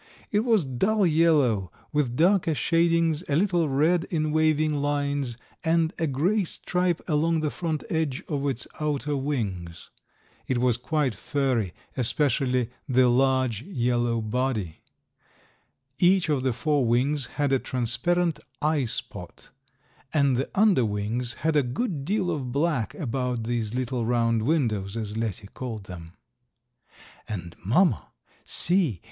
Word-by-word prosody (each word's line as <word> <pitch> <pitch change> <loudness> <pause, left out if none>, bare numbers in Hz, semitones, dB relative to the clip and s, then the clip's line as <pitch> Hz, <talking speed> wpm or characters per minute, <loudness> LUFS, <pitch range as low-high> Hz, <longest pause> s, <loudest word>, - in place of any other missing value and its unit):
It 210 - +3
was 220 - +2
dull 195 - +1
yellow, 150 - +3 0.2
with 140 -5 0
darker 170 0 +3
shadings, 165 +1 +2
a 140 - +2
little 175 -2 +2
red 155 +5 +2
in 155 -3 -1
waving 155 0 +2
lines, 145 -3 -1 0.3
and 165 +1 +2
a 165 - +1
gray 175 +10 +1
stripe 180 0 -1
along 160 0 +1
the 150 -2 -1
front 160 -4 -3
edge 155 -5 -1
of 145 -2 -2
its 125 -3 -2
outer 150 -1 -1
wings. 100 - -4 0.6
It 130 - 0
was 120 -1 +2
quite 135 0 0
furry, 120 -4 -1 0.2
especially 125 -1 +1 0.2
the 130 -1 +4
large 130 -3 +2
yellow 120 - 0
body. 110 -6 -2 1.2
Each 180 -1 +4
of 145 -4 +1
the 130 0 +1
four 145 +3 +1
wings 130 +4 +1
had 145 -2 +1
a 135 - +3
transparent 165 +9 0 0.2
eye 150 -2 +1
spot, 115 - -6 0.6
and 140 -4 +3
the 130 +3 -1
under 200 - +4
wings 110 +3 -2
had 160 -1 +2
a 145 - +5
good 140 - -3
deal 190 0 0
of 135 -6 -3
black 140 -6 0
about 125 -3 -2
these 115 -1 -2
little 125 -1 -1
round 115 -1 +1
windows, 110 -7 0
as 105 -2 -4
Letty 110 -2 -3
called 115 -5 -5
them. 85 -3 -10 1.1
"And, 90 -5 -6
mamma, 125 - +2 0.4
see! 170 - +1
135 Hz, 135 wpm, -26 LUFS, 120-160 Hz, 1.2 s, a